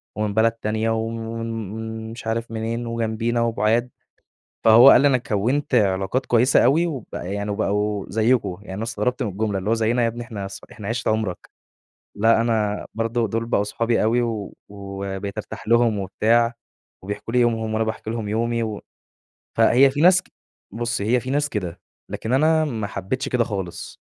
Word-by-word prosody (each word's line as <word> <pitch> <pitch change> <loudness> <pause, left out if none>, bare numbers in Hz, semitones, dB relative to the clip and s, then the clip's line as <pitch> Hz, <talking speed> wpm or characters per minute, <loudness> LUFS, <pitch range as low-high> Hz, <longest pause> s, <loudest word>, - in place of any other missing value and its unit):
ومن 105 -1 -1
بلد 110 +2 +3
تانية 110 0 -2
وم 115 0 -2 0.8
ومش 115 0 -8
عارف 115 +1 -2
منين 115 +1 -3
وجنبينا 115 0 -1
وبُعاد. 115 +1 +1 0.8
فهو 115 +4 +9
قال - - +7
لي 145 - +5
أنا 135 -2 +3
كَوّنت 125 +6 -1
علاقات 100 +3 +1
كويّسة 125 +2 +4
أوي 165 +6 +3
وب 135 -9 -5
يعني 100 +3 -3
وبقوا 105 0 -1
زيكم، 110 -3 +1
يعني 105 +1 -6
استغربت 115 +3 -1
من 115 - -1
الجملة 100 +1 -2
اللي 95 +3 -3
هو - - +4
زيينا 115 +2 +1
يا - - +3
ابني 120 +1 -4
إحنا 105 -5 -6 0.2
إحنا 105 -4 -8
عِشرة 115 0 -1
عمرك؟ 110 -5 -3 0.7
لأ 115 +2 +4
أنا 110 -3 0
برضو 115 +1 0
دول 115 +3 -2
بقوا 110 -3 +1
صحابي 115 +3 0
أوي 115 +3 +2
و 110 -4 -3 0.2
وبقيت 100 0 -6
ارتاح 110 -1 -7
لهم 115 -2 +3
وبتاع 115 +5 +2 0.5
وبيحكوا 100 +3 -6
لي 125 - +4
يومهم 115 -2 +1
وأنا 110 +1 +1
باحكي 110 0 -4
لهم 110 -2 -3
يومي. 115 +2 0
و 110 -2 -4 0.8
فهي 120 +4 +6
في 145 +2 -2
ناس 180 +2 +6 0.5
بُصّي 120 -2 -2
هي 125 +3 +3
في 125 - -7
ناس 145 +2 +1
كده، 90 - -4 0.3
لكن 115 - -3
أنا 155 +3 +3
ما 110 -8 -3
حبيتش 100 +7 -3
كده 125 -2 +2
خالص، 95 -6 -6
115 Hz, 170 wpm, -22 LUFS, 105-120 Hz, 0.8 s, فهو